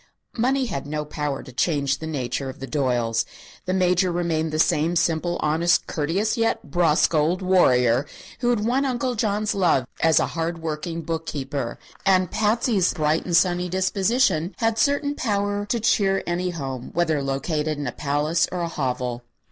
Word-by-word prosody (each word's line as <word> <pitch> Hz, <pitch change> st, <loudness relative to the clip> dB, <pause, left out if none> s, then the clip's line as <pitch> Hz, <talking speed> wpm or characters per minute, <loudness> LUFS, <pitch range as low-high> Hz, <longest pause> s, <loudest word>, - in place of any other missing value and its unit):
Money 260 Hz, +3 st, +1 dB
had 140 Hz, -, -4 dB
no 150 Hz, 0 st, -3 dB
power 150 Hz, -2 st, -3 dB
to 130 Hz, -, -12 dB
change 140 Hz, 0 st, 0 dB
the 160 Hz, -, -5 dB
nature 135 Hz, -2 st, -3 dB
of 130 Hz, -, -9 dB
the 135 Hz, -, -5 dB
Doyles. 120 Hz, -6 st, 0 dB, 0.4 s
The 185 Hz, -, -1 dB
Major 180 Hz, 0 st, +2 dB
remained 165 Hz, -2 st, -1 dB
the 155 Hz, -, -2 dB
same 155 Hz, +2 st, +2 dB
simple, 170 Hz, +1 st, +1 dB
honest, 165 Hz, +3 st, +2 dB
courteous 185 Hz, +10 st, -1 dB
yet 225 Hz, -10 st, -1 dB
brusque 165 Hz, -1 st, +3 dB
old 165 Hz, +5 st, +1 dB
warrior 130 Hz, -8 st, +3 dB, 0.3 s
who 245 Hz, -, +1 dB
had 225 Hz, -3 st, +1 dB
won 255 Hz, +4 st, +2 dB
Uncle 255 Hz, -1 st, -1 dB
John's 210 Hz, -2 st, 0 dB
love 170 Hz, -9 st, +2 dB
as 160 Hz, -3 st, +4 dB
a -, -, +2 dB
hard 165 Hz, +1 st, -2 dB
working 165 Hz, +1 st, -4 dB
book 160 Hz, 0 st, -4 dB
keeper; 135 Hz, -3 st, -4 dB, 0.3 s
and 185 Hz, -2 st, +3 dB
Patsy's 215 Hz, -3 st, +1 dB
bright 155 Hz, 0 st, +1 dB
and 175 Hz, -2 st, +3 dB
sunny 180 Hz, 0 st, +2 dB
disposition 190 Hz, -1 st, +1 dB
had 225 Hz, 0 st, 0 dB
certain 285 Hz, +1 st, +2 dB
power 205 Hz, -4 st, -1 dB
to 235 Hz, -, 0 dB
cheer 195 Hz, -3 st, +2 dB
any 175 Hz, +1 st, -1 dB
home, 135 Hz, -7 st, -5 dB
whether 160 Hz, -4 st, +1 dB
located 150 Hz, +3 st, -2 dB
in 145 Hz, -, -4 dB
a 120 Hz, -, -2 dB
palace 150 Hz, +4 st, 0 dB
or 180 Hz, -, -3 dB
a 170 Hz, -, -1 dB
hovel. 125 Hz, -5 st, -2 dB
170 Hz, 170 wpm, -23 LUFS, 150-195 Hz, 0.4 s, as